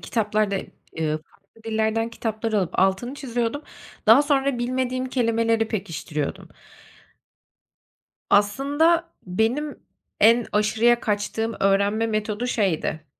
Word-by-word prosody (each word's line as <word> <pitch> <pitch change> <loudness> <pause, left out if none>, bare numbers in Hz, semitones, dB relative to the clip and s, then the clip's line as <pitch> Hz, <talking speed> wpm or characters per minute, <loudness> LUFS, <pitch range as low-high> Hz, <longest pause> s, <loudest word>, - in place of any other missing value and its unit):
kitaplarda 215 -3 0 0.4
ııı, 155 -1 -1
farklı 200 +6 -26
dillerden 220 0 0
kitaplar 225 0 -3
alıp 195 -5 -1
altını 195 +7 +1
çiziyordum. 245 +1 -3 0.4
Daha 230 +6 +8
sonra 280 -3 +1
bilmediğim 255 +1 -1
kelimeleri 230 -2 +1
pekiştiriyordum. 165 -8 -4 1.8
Aslında 290 +11 +2
benim 230 +11 -1 0.4
en 230 +2 +5
aşırıya 220 +3 +3
kaçtığım 220 +2 -2
öğrenme 200 +3 +2
metodu 215 +1 -2
şeydi, 165 -8 -1
225 Hz, 95 wpm, -23 LUFS, 205-245 Hz, 1.8 s, Daha